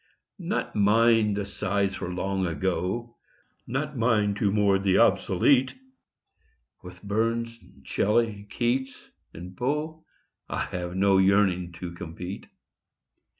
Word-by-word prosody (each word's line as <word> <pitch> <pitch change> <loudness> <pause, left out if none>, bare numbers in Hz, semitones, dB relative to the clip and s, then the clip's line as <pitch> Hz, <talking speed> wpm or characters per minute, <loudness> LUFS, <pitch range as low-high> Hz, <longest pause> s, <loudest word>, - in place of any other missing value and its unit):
Not - - -3
mine 110 +1 +4
the 100 -1 -2
sighs 100 -1 -1
for 90 - -5
Long 95 +1 -1
Ago; 95 +8 -2 0.5
Not 145 +5 -3
mine 110 -3 +2
to 100 0 0
mourn 100 -2 +2
the 95 -1 +2
obsolete; 130 +8 +3 1.1
With 90 +1 -12
Burns 115 +3 -1
and 70 -1 -21
Shelley, 105 - 0
Keats 130 +2 -2 0.2
and 90 +3 -10
Poe 150 - -3 0.5
I - - -2
have 90 0 -4
no 95 0 +4
yearning 95 -2 +2
to 85 +1 -7
compete. 90 +2 -8
100 Hz, 115 wpm, -26 LUFS, 90-115 Hz, 1.1 s, mine